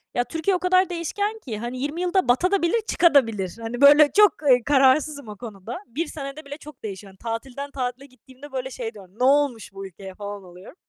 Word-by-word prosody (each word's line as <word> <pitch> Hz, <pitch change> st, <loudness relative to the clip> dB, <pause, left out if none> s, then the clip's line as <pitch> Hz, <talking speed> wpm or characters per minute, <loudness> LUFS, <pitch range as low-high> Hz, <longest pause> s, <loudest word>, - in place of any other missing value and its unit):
ya 245 Hz, -, +2 dB
Türkiye 325 Hz, +9 st, -1 dB
o -, -, -1 dB
kadar 370 Hz, 0 st, +3 dB
değişken 405 Hz, +6 st, -3 dB
ki, 235 Hz, -, -6 dB
hani, 240 Hz, +2 st, -5 dB
20 295 Hz, +5 st, -3 dB
yılda 360 Hz, +1 st, +1 dB
batabilir 345 Hz, -, +2 dB
de 460 Hz, -, +2 dB
çıkabilir 275 Hz, -, +3 dB, 0.2 s
de. -, -, -13 dB
Hani, 240 Hz, +3 st, -5 dB
böyle 290 Hz, +1 st, +8 dB
çok, 420 Hz, -1 st, +8 dB, 0.2 s
eee, 250 Hz, -2 st, +5 dB
kararsızım 280 Hz, 0 st, +3 dB
o 210 Hz, -, -8 dB
konuda. 220 Hz, 0 st, -8 dB
1 300 Hz, +8 st, -3 dB
senede 280 Hz, 0 st, -7 dB
bile 285 Hz, +1 st, -8 dB
çok 300 Hz, -5 st, -14 dB
değişiyor. 195 Hz, -1 st, -7 dB
Hani, 190 Hz, -, -22 dB, 0.2 s
tatilden 270 Hz, +4 st, -6 dB
tatile 255 Hz, 0 st, -4 dB
gittiğimde 260 Hz, +2 st, -16 dB
böyle 265 Hz, 0 st, -4 dB
şey 230 Hz, -3 st, -5 dB
diyorum, 195 Hz, -2 st, -15 dB
"Ne -, -, 0 dB
olmuş 270 Hz, -7 st, +2 dB
bu 195 Hz, 0 st, -7 dB
ülkeye?" 190 Hz, +1 st, -11 dB
falan, 205 Hz, -1 st, -7 dB
oluyorum. 180 Hz, -, -14 dB
265 Hz, 210 wpm, -23 LUFS, 225-310 Hz, 0.2 s, böyle